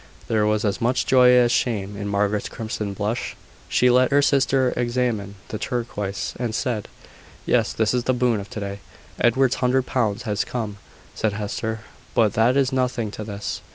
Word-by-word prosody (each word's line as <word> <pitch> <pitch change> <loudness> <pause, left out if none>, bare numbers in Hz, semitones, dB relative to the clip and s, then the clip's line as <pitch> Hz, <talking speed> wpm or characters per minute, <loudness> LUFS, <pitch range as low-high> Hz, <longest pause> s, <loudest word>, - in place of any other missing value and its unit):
There 110 -2 +2
was 105 0 +1
as 100 +2 -1
much 125 +2 +1
joy 125 -1 +6
as 125 -1 +5
shame 105 -6 0
in 100 0 -4
Margaret's 100 +1 0
crimson 105 -3 -4
blush. 105 +3 -2 0.3
She 125 0 +4
let 125 +1 +4
her 145 0 +4
sister 135 -2 +3
examine 120 -4 -1
the 110 - -4
turquoise, 105 -7 -3
and 120 -3 -2
said: 120 -5 -2 0.6
"Yes, - - +2
this 110 0 +1
is 125 -1 0
the 130 - +2
boon 120 -3 +2
of 100 0 -8
to - - -6
day." 100 0 -5 0.4
"Edward's 130 +2 +3
hundred 130 0 +2
pounds 115 -4 -1
has 105 -3 -1
come," 110 -4 -4 0.4
said 110 -2 -1
Hester: 110 +2 -3 0.3
"but 110 -3 +3
that 120 +4 +3
is 135 -1 +2
nothing 125 -4 0
to 110 - -6
this." 105 -1 -5
115 Hz, 180 wpm, -23 LUFS, 105-125 Hz, 0.6 s, joy